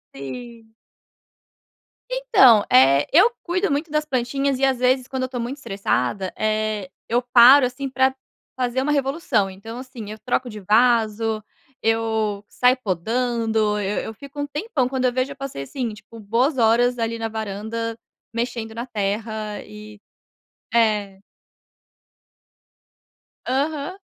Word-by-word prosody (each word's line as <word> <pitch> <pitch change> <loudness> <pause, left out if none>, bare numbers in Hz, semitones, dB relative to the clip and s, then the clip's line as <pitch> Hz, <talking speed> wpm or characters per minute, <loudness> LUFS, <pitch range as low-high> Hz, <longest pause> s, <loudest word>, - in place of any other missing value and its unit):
Sim. 225 - -9 1.4
Então, 445 - +5
eh, 135 +2 +5
eu 390 +10 +6
cuido 365 -1 0
muito 295 +3 -1
das 305 0 0
plantinhas 275 0 -1
e 270 - +3
às 265 -2 +1
vezes 255 0 +2
quando 260 -1 -3
eu - - +1
estou 255 -1 -5
muito 245 +4 -4
estressada, 195 - -2
eh, 215 -2 -1 0.2
eu 240 +2 +1
paro 250 +2 +7
assim 260 +2 -4
para 265 0 +2 0.4
fazer 255 0 -1
uma 295 +2 0
revolução, 270 - 0
então 225 +5 -9
assim 245 -5 -8
eu 215 - -9
troco 250 +2 -1
de 215 -1 -8
vaso, 220 0 +2 0.4
eu 220 -2 0
saio 250 +1 +3
podando, 220 +2 0
eu 205 0 -2
eu 220 - -6
fico 280 +6 -11
um 285 - -1
tempão, 295 - -2
quando 260 0 -1
eu 245 - +2
vejo 260 +2 -1
eu - - -8
passei 270 - -6
assim 245 - -4
tipo 215 +2 -13
boas 235 +7 0
horas 240 +2 +3
ali 230 0 -1
na 225 0 -3
varanda 220 +1 -4 0.3
mexendo 230 -1 -4
na 235 +1 -4
terra 215 -1 -3
e 210 0 -12 0.7
é. 210 -4 +1 2.3
Aham. 285 +6 -2
235 Hz, 140 wpm, -22 LUFS, 215-260 Hz, 2.3 s, paro